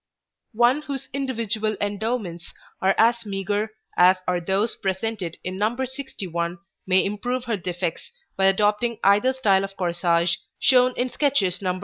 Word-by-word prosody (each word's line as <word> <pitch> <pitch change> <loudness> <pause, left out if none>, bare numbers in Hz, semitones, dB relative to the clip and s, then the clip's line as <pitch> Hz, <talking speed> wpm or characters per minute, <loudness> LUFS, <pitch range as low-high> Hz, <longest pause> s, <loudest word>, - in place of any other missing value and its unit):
One 240 +5 +4
whose 275 -2 -6
individual 225 -6 -1
endowments 205 -4 -3 0.3
are 190 +1 +3
as 235 +1 +4
meagre 205 +1 -2 0.3
as 180 +1 +6
are 180 -1 +1
those 195 +6 0
presented 190 -2 -3
in 185 +1 -4
No. 220 +4 0
61 200 - -4 0.3
may 185 0 +4
improve 245 +5 -2
her 235 -3 0
defects 175 -2 -4 0.2
by 190 - +2
adopting 210 +4 +2
either 205 +6 +4
style 205 -7 +2
of 195 0 -7
corsage, 170 -1 +1 0.2
shown 250 -1 +4
in 250 +1 -1
sketches 210 - +1
Nos. 185 -1 -1
205 Hz, 140 wpm, -24 LUFS, 185-240 Hz, 0.3 s, as